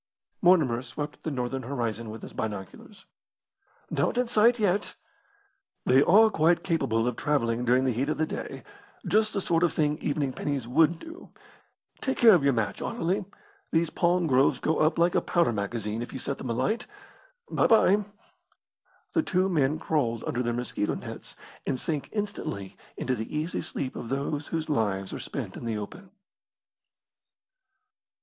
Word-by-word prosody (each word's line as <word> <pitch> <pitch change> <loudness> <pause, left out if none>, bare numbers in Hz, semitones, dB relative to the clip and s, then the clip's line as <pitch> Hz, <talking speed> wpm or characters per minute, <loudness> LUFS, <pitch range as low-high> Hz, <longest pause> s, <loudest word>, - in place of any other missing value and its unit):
Mortimer 155 -10 +4
swept 145 +4 -6
the - - -3
northern 130 -1 -2
horizon 115 -4 -3
with 110 +1 -8
his - - -9
binoculars. 110 - -6 0.9
"Not - - 0
in 250 0 +2
sight 235 +1 +4
yet." 205 -2 0 0.9
"They 130 +2 +5
are 215 +8 +6
quite 165 -1 +3
capable 115 -10 +1
of 125 - -1
travelling 120 -5 0
during 125 +2 +3
the 130 - +2
heat 130 +5 -1
of 155 - -1
the 160 - +1
day. - - -6 0.4
Just 215 +1 +2
the 200 - 0
sort 170 -2 +1
of 175 - +3
thing 150 -1 +1
evening 145 -3 -1
pennies 140 -4 -3
would 160 +6 +3
do. 325 - -11 0.7
Take 265 - -1
care 230 -2 +8
of 170 -6 +4
your 140 - +4
match, 105 -4 -1
Anerley. 185 +4 -1 0.5
These 165 0 +1
palm 175 0 +2
groves 135 -2 +3
go 160 - 0
up 155 +1 +3
like 170 +1 +3
a - - +3
powder 170 -9 +2
magazine 105 +1 -3
if 120 - -6
you - - -4
set 135 +1 -3
them 130 - -5
alight. 215 - -1 0.6
Bye - - +3
bye." 210 -2 +5 1.1
The 325 - +3
two 185 - +1
men 150 -4 +2
crawled 125 -8 -1
under 120 - -1
their 120 -1 0
mosquito 120 -3 -2
nets - - -7 0.3
and 130 -2 0
sank 150 -1 -2
instantly 205 - -4 0.2
into 130 - -1
the 115 +5 -4
easy 155 +4 -2
sleep 130 - -4
of 115 - -6
those 145 +2 -2
whose 160 -1 -3
lives 100 -8 -1
are - - -5
spent - - -5
in - - -7
the 115 -2 -1
open. 180 - -8
145 Hz, 170 wpm, -27 LUFS, 120-175 Hz, 1.1 s, care